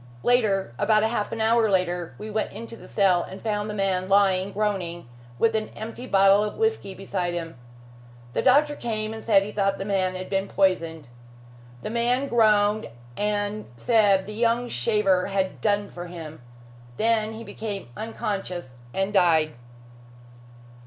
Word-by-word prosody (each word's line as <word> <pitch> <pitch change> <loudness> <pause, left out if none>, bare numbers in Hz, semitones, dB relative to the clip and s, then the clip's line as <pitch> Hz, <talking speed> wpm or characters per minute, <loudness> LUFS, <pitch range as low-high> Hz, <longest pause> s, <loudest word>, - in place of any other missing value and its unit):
Later 205 - +2
about 215 -1 +3
half 220 -1 -1
an 230 - -4
hour 225 0 +3
later, 180 -3 0
we 215 +1 -7
went 215 +1 -1
into 230 0 -8
the - - -13
cell 190 -4 +3
and 190 - -8
found 210 -1 -2
the - - -3
man 190 -2 0
lying 195 -1 +3
groaning, 190 - -2 0.3
with 225 - +2
an 215 -1 -1
empty 230 +3 -7
bottle 195 0 +5
of 210 - -4
whisky 445 - -1
beside 185 -2 -3
him. 165 -1 -5 0.8
The - - 0
doctor 295 +3 +4
came 220 -4 -3
and 220 - -8
said 200 -4 +4
he 205 - -6
thought 195 -1 0
the 195 - -5
man 190 -2 0
had 185 0 -5
been 195 0 -1
poisoned. 165 -7 0 0.8
The 215 - -4
man 245 +4 +1
groaned 215 -3 +3 0.3
and 205 0 -1
said 200 - +3
the 210 - -7
young 235 +2 +1
shaver 185 - +1
had 195 -1 -2
done 205 -1 +1
for 175 0 -8
him. 160 -4 -9 0.6
Then 220 -1 +1
he 225 +1 -8
became 205 - -6
unconscious 195 - -4 0.2
and 195 +2 -1
died." 165 -5 +3
205 Hz, 160 wpm, -25 LUFS, 190-220 Hz, 0.8 s, bottle